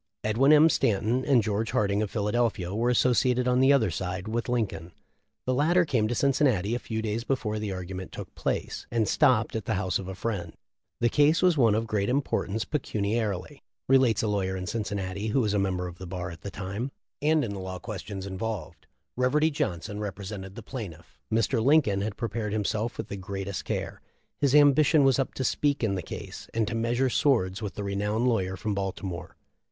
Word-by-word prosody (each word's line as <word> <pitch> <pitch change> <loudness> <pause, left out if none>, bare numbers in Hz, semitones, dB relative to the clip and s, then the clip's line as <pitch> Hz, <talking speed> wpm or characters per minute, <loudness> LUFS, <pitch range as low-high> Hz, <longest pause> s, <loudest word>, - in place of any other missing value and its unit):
Edwin 115 +7 +3
M. 155 +1 +8
Stanton 115 -2 +1
and 130 -6 +4
George 110 +1 -1
Harding, 100 0 +2
of 105 - -1
Philadelphia, 105 -3 0
were 115 +3 +1
associated 125 +1 +3
on 125 0 +3
the 135 +1 +6
other 135 -6 +3
side 95 +1 -4
with 115 +2 -2
Lincoln. 95 -9 -2 0.5
The 130 - +1
latter 170 +7 +3
came 120 -8 +1
to 120 - -1
Cin 140 +4 +3
cinnati 115 -7 +2
a - - -2
fe 110 -1 -2
before 110 -5 -1
the 105 -2 -3
argument 95 0 -6
took - - -8
place, - - -3
and 115 -2 +1
topped 115 +1 +3
at 110 -3 -3
the 110 - 0
house 95 -1 0
of 95 - -7
a 95 - -5
friend. 95 -6 -3 0.5
"The 120 - +4
ca 150 - +1
e 155 - +4 0.2
one 115 -7 +4
of 115 +1 0
great 105 -2 -1
importance 120 -5 0
pecuniarily," 110 - -2 0.3
relates 130 -5 +4
a 110 - +1
in 95 -1 -2
Cincinnati, 100 -1 -3
who 110 +5 +1
was 105 -3 0
a 100 - +2
member 95 -2 0
of 90 -1 -8
the 95 - -7
bar 90 0 -4
at 85 -1 -11
the 100 - -5
time, 100 +6 -4 0.3
"and 155 -1 +3
in 105 - -4
the 100 - -5
law 95 0 -5
questions 100 -2 -6
involved. 95 -5 -5 0.3
Reverdy 150 +6 +2
Johnson 105 - -3
represented 100 -1 -6
the 115 - -8
plaintiff. 95 - -8
Mr. 115 +1 +1
Lincoln 130 -8 +4
had 105 0 -3
prepared 110 -2 -3
himself 110 +2 -1
with - - -4
the 100 - -5
gre 95 +1 -5
' 95 - -4
care; - - -4 0.4
his 140 -1 +3
ambition 145 +1 +6
was 135 0 +4
up 135 - -1
to 130 - -2
speak 140 +1 +1
in 105 -3 +1
the 95 - -2
case - - -8
and 115 -2 +1
to - - -3
measure 120 +3 +1
swords 110 -10 +2
with 105 -4 -5
the 105 - -4
renowned 105 +4 0
lawyer 95 -6 0
from 105 +1 -2
Baltimore. 95 -3 -4
110 Hz, 200 wpm, -27 LUFS, 95-125 Hz, 0.5 s, M